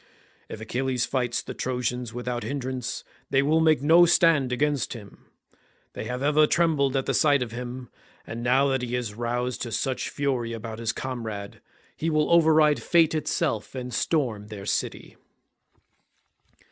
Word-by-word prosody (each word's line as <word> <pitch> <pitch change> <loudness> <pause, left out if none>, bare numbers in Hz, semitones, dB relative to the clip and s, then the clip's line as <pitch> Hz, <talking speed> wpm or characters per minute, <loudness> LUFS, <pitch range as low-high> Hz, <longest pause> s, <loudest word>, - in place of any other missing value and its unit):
If - - -7
Achilles 125 +2 -1
fights 125 -3 -1
the - - -7
Trojans 125 -2 -3
without 120 0 -4
hindrance 130 -3 -4 0.3
they 135 0 +3
will 155 +3 +3
make 155 -4 +3
no 170 +3 +6
stand 165 -7 +4
against 145 +2 0
him; 105 -5 -13 0.7
they - - -6
have 125 +2 -4
ever 150 +1 +4
trembled 150 -6 +2
at 135 - 0
the - - 0
sight 145 -4 +3
of 115 - -8
him, 125 +1 -6 0.4
and 115 +1 -6
now 130 +3 +3
that 135 -1 0
he 125 0 -3
is 120 -4 -3
roused 120 +2 -2
to 120 - -4
such 125 +4 -2
fury 130 -5 -2
about 110 0 -6
his 115 -1 -1
comrade, 115 -6 -6 0.3
he 165 - -2
will 155 0 +1
override 155 -3 +5
fate 165 -2 +3
itself 135 -7 -2
and 125 -1 -5
storm 115 -7 -1
their 105 -2 -8
city." - - -3
125 Hz, 160 wpm, -26 LUFS, 120-145 Hz, 0.7 s, no